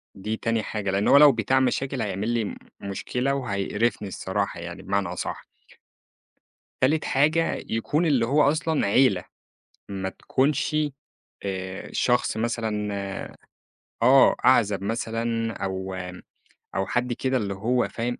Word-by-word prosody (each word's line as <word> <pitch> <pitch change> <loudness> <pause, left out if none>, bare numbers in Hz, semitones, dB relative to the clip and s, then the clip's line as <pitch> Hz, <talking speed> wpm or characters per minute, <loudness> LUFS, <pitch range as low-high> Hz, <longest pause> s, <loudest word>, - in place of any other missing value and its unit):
دي 105 +3 -3
تاني 115 -2 0
حاجة، 100 -3 -3
لإنّه 100 +2 +2
هو 140 - +8
لو 145 0 +9
بتاع 125 +2 +1
مشاكل، 130 0 0
هيعمل 105 +1 -2
لي 120 -1 +1
م - - -5 0.3
مشكلة 125 +7 -2
وهيقرفني 105 -2 -1
الصراحة 95 -1 -3
يعني 85 +1 -7
بمعنى 100 -1 -1
أصح. 90 +1 -5 1.3
تالت 150 +4 +2
حاجة، 155 +4 +1
يكون 145 +9 0
اللي 130 -7 +3
هو 145 +5 +3
أصلًا 155 -1 +1
عيلة. 100 -3 +3 0.7
ما 95 -1 -3
تكونش 140 +8 0 0.7
آآ 95 -1 -5
شخص 125 -3 +1
مثلًا 110 -2 -1 1.1
آه. 130 +3 +7
أعزب 105 -6 +4
مثلًا 115 +1 -2
أو 95 -2 -4 0.8
أو 95 +1 +1
حد 125 0 0
كده 130 +2 0
اللي 100 -4 -2
هو 120 +6 0
فاهم 120 +1 -3
115 Hz, 130 wpm, -25 LUFS, 100-130 Hz, 1.3 s, لو